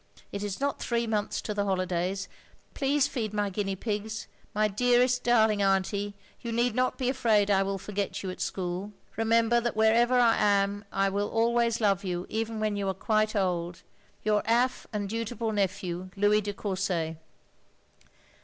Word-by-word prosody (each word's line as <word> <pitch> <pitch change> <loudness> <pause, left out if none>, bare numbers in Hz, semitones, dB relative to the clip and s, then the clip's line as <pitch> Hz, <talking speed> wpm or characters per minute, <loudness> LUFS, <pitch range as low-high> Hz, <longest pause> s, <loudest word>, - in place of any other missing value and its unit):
It 200 - -4
is 205 -2 -4
not 280 +1 -1
three 235 -1 0
months 215 -2 -1
to 210 - -3
the 205 0 0
hollydays. 185 0 -1 0.5
Plese 280 0 +2
feed 220 -7 -3
my 205 -1 0
guiny 195 -1 -2
pigs. 215 0 -3 0.3
My 215 +1 +2
derest 245 +4 +3
darling 220 -4 +3
Anty, 200 +1 +1 0.2
you 235 - -5
need 240 0 +1
not 255 +2 0
be 255 - -1
afrade 220 -6 +2
I 195 -1 +4
will 195 0 -1
forget 200 +1 -4
you 190 - -3
at - - -9
schole. 185 +2 -3
" - - -32
Rember 230 +1 +3
that 240 -2 -2
werever 235 +3 +4
I 235 -2 +4
am 200 0 +2
I 195 0 +1
will 200 +1 -1
holways 235 0 +2
love 200 -4 +2
you 180 -1 -3
even 225 0 -2
when 215 -1 0
you 200 -1 -2
are 190 - -2
quit 215 +2 +1
old. 175 -3 -1 0.2
" - - -34
Your 210 -1 +3
off. 245 +2 +2
and 205 -2 -2
dutiful 230 +1 -3
nephew, 185 -3 -2
" - - -25
Louis 205 +1 +4
de 205 0 -4
Courset. 185 -5 -2
210 Hz, 180 wpm, -28 LUFS, 195-230 Hz, 0.5 s, I